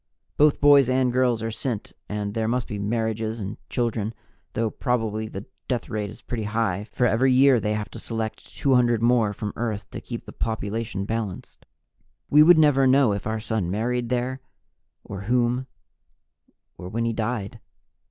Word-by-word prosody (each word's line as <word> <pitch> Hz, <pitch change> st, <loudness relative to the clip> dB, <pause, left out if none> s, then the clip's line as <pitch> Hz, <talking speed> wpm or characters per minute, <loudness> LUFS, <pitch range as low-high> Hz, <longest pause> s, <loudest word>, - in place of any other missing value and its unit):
Both 150 Hz, 0 st, +4 dB
boys 140 Hz, -3 st, +6 dB
and 130 Hz, -1 st, +2 dB
girls 125 Hz, -3 st, +2 dB
are 115 Hz, -, -2 dB
sent 110 Hz, -1 st, -4 dB, 0.2 s
and 105 Hz, -1 st, -3 dB
there 110 Hz, 0 st, -1 dB
must 125 Hz, +2 st, 0 dB
be 105 Hz, -4 st, -5 dB
marriages 110 Hz, +1 st, -1 dB
and 100 Hz, +1 st, -5 dB
children 115 Hz, -2 st, -1 dB, 0.4 s
though 115 Hz, -1 st, 0 dB
probably 110 Hz, -4 st, -1 dB
the 100 Hz, -1 st, -7 dB, 0.2 s
death 125 Hz, -3 st, -2 dB
rate 105 Hz, -1 st, -3 dB
is 105 Hz, -, -12 dB
pretty 115 Hz, -3 st, -4 dB
high, 105 Hz, -3 st, -1 dB
for 125 Hz, -, +1 dB
every 125 Hz, +3 st, +3 dB
year 130 Hz, -1 st, +5 dB
they 105 Hz, 0 st, -1 dB
have 105 Hz, -1 st, -4 dB
to -, -, -8 dB
select 110 Hz, -1 st, -5 dB
200 120 Hz, -4 st, +3 dB
more 120 Hz, -3 st, +3 dB
from 105 Hz, 0 st, -5 dB
Earth 110 Hz, -3 st, -3 dB
to -, -, -6 dB
keep 120 Hz, -2 st, -7 dB
the -, -, -10 dB
population 110 Hz, -2 st, -3 dB
balanced. 110 Hz, -3 st, -5 dB, 0.6 s
We 150 Hz, -, +7 dB
would 170 Hz, +2 st, +8 dB
never 145 Hz, -4 st, +5 dB
know 130 Hz, -3 st, +5 dB
if 100 Hz, +1 st, -4 dB
our 110 Hz, 0 st, -1 dB
son 110 Hz, -5 st, -2 dB
married 120 Hz, +4 st, -1 dB
there, 125 Hz, +1 st, -1 dB, 0.6 s
or 100 Hz, -, -7 dB
whom, 125 Hz, +3 st, +1 dB, 1.1 s
or 90 Hz, -, -7 dB
when 115 Hz, +4 st, -1 dB
he 115 Hz, -, 0 dB
died. 110 Hz, -2 st, -3 dB
115 Hz, 170 wpm, -24 LUFS, 105-125 Hz, 1.1 s, would